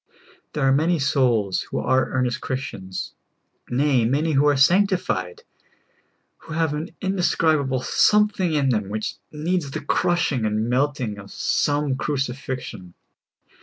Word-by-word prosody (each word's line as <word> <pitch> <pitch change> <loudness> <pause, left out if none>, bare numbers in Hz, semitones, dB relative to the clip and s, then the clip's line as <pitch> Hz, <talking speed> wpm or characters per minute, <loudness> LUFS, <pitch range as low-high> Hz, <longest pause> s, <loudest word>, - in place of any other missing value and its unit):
* - - -30
There 150 - -2
are - - +4
many 160 +5 +2
souls 125 -8 +1
w^ho - - -2
are 130 +1 +2
earnest 125 0 -1
Christians 100 -8 -5 0.3
— - - -50 0.2
nay, 130 -1 +2
man}^ 145 +7 +1
who 145 +1 +4
are 145 -2 +3
sanctified 195 - +2 0.5
— - - -43
who 160 - -10
have 160 -2 0
an 155 +5 -5
indescribable 160 -8 +1
something 210 -4 +3
in 140 -2 +2
them 105 -5 0
which 110 +1 -4
needs 155 0 -2
the - - -5
crushing 160 -5 +1
and 110 +1 0
melting 125 -4 -1
of 100 -1 -11
some 145 +6 0
great 130 - -4
cru 150 - -1
cifixion. 125 -8 -5
140 Hz, 150 wpm, -23 LUFS, 125-160 Hz, 0.5 s, are